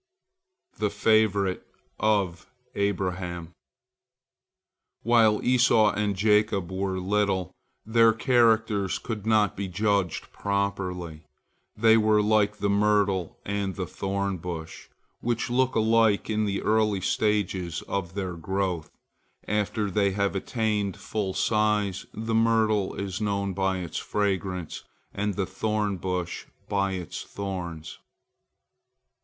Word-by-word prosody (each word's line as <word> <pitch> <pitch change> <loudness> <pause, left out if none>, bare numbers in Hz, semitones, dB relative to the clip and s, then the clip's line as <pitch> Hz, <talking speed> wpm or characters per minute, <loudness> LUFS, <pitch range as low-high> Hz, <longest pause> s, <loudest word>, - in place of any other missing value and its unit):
THE 105 -1 +1
FAVORITE 105 -2 +2 0.4
OF 100 -5 0 0.3
ABRAHAM 90 -4 -2 1.5
While 115 -2 +4
Esau 120 -4 +4
and 105 -1 -1
Jacob 105 -2 +2
were 95 0 -2
little, 95 -1 0 0.3
their 115 +1 +5
characters 110 -4 +2
could 110 -3 -6
not 110 -3 +3
be 100 0 -3
judged 100 -1 -1
properly. 90 -5 -3 0.5
They 110 +1 +5
were 110 -1 +3
like 105 0 +2
the 100 - -1
myrtle 100 -3 +1
and 100 -2 -2
the - - -3
thorn 100 0 -2
bush, 80 -2 -7 0.3
which 120 0 -2
look 130 +1 +2
alike 110 -1 +3
in 110 0 +1
the 100 -1 -2
early 105 -2 +2
stages 95 -4 0
of 95 -2 -4
their 95 -3 -3
growth. 90 -1 -2 0.6
After 105 0 -1
they 100 0 +2
have 100 0 0
attained 105 -2 -1
full 100 -3 -3
size, 105 -3 +1
the 115 +1 -4
myrtle 110 -3 +2
is 100 0 -4
known 100 -2 -1
by 95 0 0
its 85 -3 -4
fragrance, 95 -4 -2 0.3
and 100 -1 -2
the 95 - 0
thorn 105 -2 -1
bush 90 -1 -3 0.2
by 100 -1 0
its 90 -4 -5
thorns. 90 -5 -6
100 Hz, 115 wpm, -26 LUFS, 95-110 Hz, 1.5 s, their